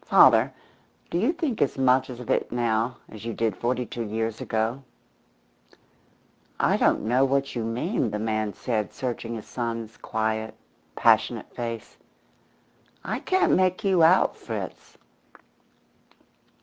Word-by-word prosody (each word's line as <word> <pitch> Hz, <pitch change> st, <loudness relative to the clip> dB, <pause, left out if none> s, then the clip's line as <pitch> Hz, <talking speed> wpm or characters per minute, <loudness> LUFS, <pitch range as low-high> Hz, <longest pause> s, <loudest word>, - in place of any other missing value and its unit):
Father, -, -, +6 dB, 0.6 s
do 170 Hz, -, +1 dB
you 230 Hz, -, +3 dB
think 315 Hz, -9 st, -2 dB
as 140 Hz, -, +1 dB
much 130 Hz, 0 st, +3 dB
of 125 Hz, -1 st, -8 dB
it -, -, 0 dB
now 120 Hz, 0 st, 0 dB
as 110 Hz, -, -11 dB
you 115 Hz, -1 st, -4 dB
did 110 Hz, -3 st, 0 dB
forty 125 Hz, +4 st, -1 dB
two 120 Hz, +2 st, -6 dB
years 110 Hz, 0 st, -3 dB
ago?" 110 Hz, +4 st, -1 dB, 1.8 s
"I -, -, +3 dB
don't -, -, +2 dB
know 125 Hz, +5 st, +3 dB
what 135 Hz, 0 st, +1 dB
you 120 Hz, -, -1 dB
mean," 120 Hz, -, -1 dB
the 105 Hz, -, -3 dB
man 110 Hz, -1 st, -1 dB
said, 110 Hz, -6 st, -2 dB
searching 120 Hz, -2 st, -4 dB
his 110 Hz, -, -7 dB
son's 115 Hz, -2 st, -4 dB
quiet, 110 Hz, 0 st, -2 dB, 0.4 s
passionate -, -, +2 dB
face. 115 Hz, -1 st, -5 dB, 1.1 s
"I -, -, -2 dB
can't 375 Hz, 0 st, +2 dB
make 185 Hz, +2 st, +2 dB
you 190 Hz, -4 st, +3 dB
out, 170 Hz, +4 st, +5 dB
Fritz." -, -, -7 dB
120 Hz, 135 wpm, -26 LUFS, 110-135 Hz, 1.8 s, Father